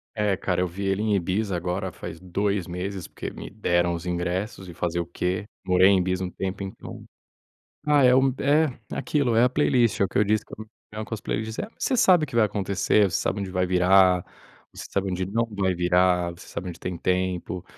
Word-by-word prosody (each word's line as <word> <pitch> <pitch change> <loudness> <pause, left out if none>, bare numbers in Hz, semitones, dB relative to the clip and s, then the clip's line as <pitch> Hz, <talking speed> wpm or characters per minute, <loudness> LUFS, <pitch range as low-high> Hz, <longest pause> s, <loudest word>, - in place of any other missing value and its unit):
É 105 -2 +1
cara, 90 -1 -1
eu 90 - +1
vi 95 +4 -7
ele 95 +1 0
em 105 -2 +1
Ibiza 95 +2 -1
agora, 90 +2 -2
faz 80 -1 -8
2 100 +1 -1
meses, 90 +1 -5
porque - - -6
me - - -9
deram 85 0 +1
os 85 +1 -5
ingressos, 90 +2 -3
e 85 - -9
fazer 85 0 -2
o 85 - -1
quê? 90 +3 -2 0.2
Morei 90 +1 +5
em 100 - +5
Ibiza 95 +1 -1
um 90 - -6
tempo, 95 +1 -4
então. 95 - -8 0.8
Ah, 145 -2 +4
é 125 0 +6
um 130 0 +4
é 150 +3 +4 0.3
aquilo, 135 -6 0
é 115 - +5
a 125 - +4
playlist, 120 -5 +2
é - - +4
o - - +2
que - - -3
eu 105 - +5
disse 105 +1 +1
com 110 - -9 0.5
as 110 - -5
playlists. 110 +1 -3
É, - - -3
você 260 - 0
sabe 185 -9 +5
o - - -17
que 120 - -8
vai 110 -2 +5
acontecer, 100 0 +1
você - - 0
sabe 100 - -1
onde 95 -1 -4
vai 90 0 +1
virar, 90 0 +4 0.5
você - - -8
sabe 100 -1 -1
onde 90 +1 -2
não 115 +4 0
vai 95 -2 +1
virar, 90 0 +2
você 85 - -13
sabe 95 - -6
onde 85 - -9
tem 90 -1 -4
tempo. 90 0 -1
95 Hz, 220 wpm, -25 LUFS, 90-105 Hz, 0.8 s, é